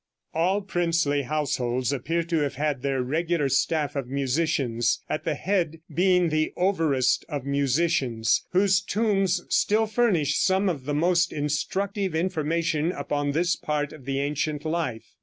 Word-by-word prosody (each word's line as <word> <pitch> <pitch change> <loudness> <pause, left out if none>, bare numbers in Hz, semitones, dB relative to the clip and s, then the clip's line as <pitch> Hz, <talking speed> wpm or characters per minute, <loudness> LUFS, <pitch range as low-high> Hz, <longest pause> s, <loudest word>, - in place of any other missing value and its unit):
All 185 +5 +1
princely 170 -6 +1
households 130 -3 -1
appear 165 +6 -1
to 165 0 -1
have 145 -2 -1
had 145 -1 -1
their 135 -2 0
regular 160 +2 0
staff 150 +2 0
of 135 -3 -3
musicians, 135 -3 0
at - - -3
the 160 - 0
head 170 -2 -1
being 180 -1 +3
the 155 0 0
"Overest 165 -9 +2
of 145 -4 -4
Musicians," 140 -5 +1
whose 190 0 +3
tombs 195 -3 +1
still 220 +2 +2
furnish 200 - +1
some 190 +1 +2
of 145 -7 -4
the 145 0 -1
most 175 +3 +2
instructive 190 +6 -2
information 165 -1 0
upon 145 -5 -2
this 170 +3 +1
part 150 -1 -2
of 145 -5 -13
the 135 0 -1
ancient 150 +1 -2
life. 155 -8 -3
155 Hz, 145 wpm, -25 LUFS, 140-175 Hz, -, being